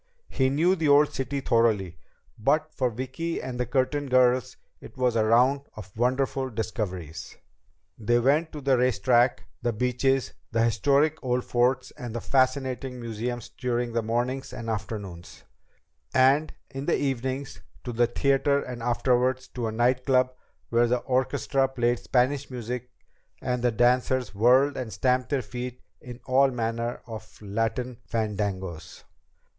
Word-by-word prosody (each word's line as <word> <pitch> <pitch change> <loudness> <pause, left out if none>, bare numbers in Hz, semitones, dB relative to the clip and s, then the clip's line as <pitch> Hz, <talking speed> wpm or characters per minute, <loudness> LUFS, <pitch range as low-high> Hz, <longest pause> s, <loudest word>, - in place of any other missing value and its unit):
He 130 -1 +1
knew 165 +7 +3
the 160 -4 0
old 145 +1 +5
city 135 +1 -3
thoroughly, 105 -9 +1 0.4
but 150 +7 +1
for 130 -2 0
Vicki 130 +8 -4
and 125 -1 -6
the 125 - -1
Curtin 135 +2 0
girls 130 0 +3 0.2
it - - -13
was 125 -2 +1
a 110 - +3
round 125 +5 +4
of 95 -3 -11
wonderful 130 +3 0
discoveries. 100 - -5 0.6
They 120 +2 +2
went 145 +7 +2
to 150 - -6
the 135 -2 +2
race 125 -2 +2
track, 120 +3 +3 0.2
the 120 - 0
beaches, 125 +3 0 0.2
the 115 -1 +2
historic 140 +7 +2
old 125 -1 0
forts 125 +2 +1
and 120 -5 -8
the - - -1
fascinating 130 0 0
museums 115 +1 -4
during 120 -1 -2
the 115 - +1
mornings 120 +4 -2
and 120 -3 -5
afternoons, 100 -5 -6 0.7
and 135 +4 +4 0.2
in 135 +1 -6
the 170 - +3
evenings 135 +1 -3 0.2
to 120 - -5
the 120 +1 +3
theater 140 +3 +2
and 125 -3 -6
afterward 125 +1 +2 0.2
to 120 -2 -2
a - - -2
night 125 +3 +1
club 130 -1 +3 0.4
where 120 +1 +3
the 125 +1 +2
orchestra 130 +2 0
played 120 -2 0
Spanish 130 +2 +1
music 125 0 -5 0.5
and 125 -1 -2
the 120 - +3
dancers 125 0 +2
whirled 125 +7 +4
and 125 -4 -4
stamped 125 +1 +1
their 140 -3 0
feet 125 0 -6 0.2
in 125 -1 -9
all 135 +1 +4
manner 115 -1 -3
of 110 -2 -10
Latin 115 +4 -2
fandangos. 100 -6 -3
125 Hz, 150 wpm, -26 LUFS, 115-130 Hz, 0.7 s, old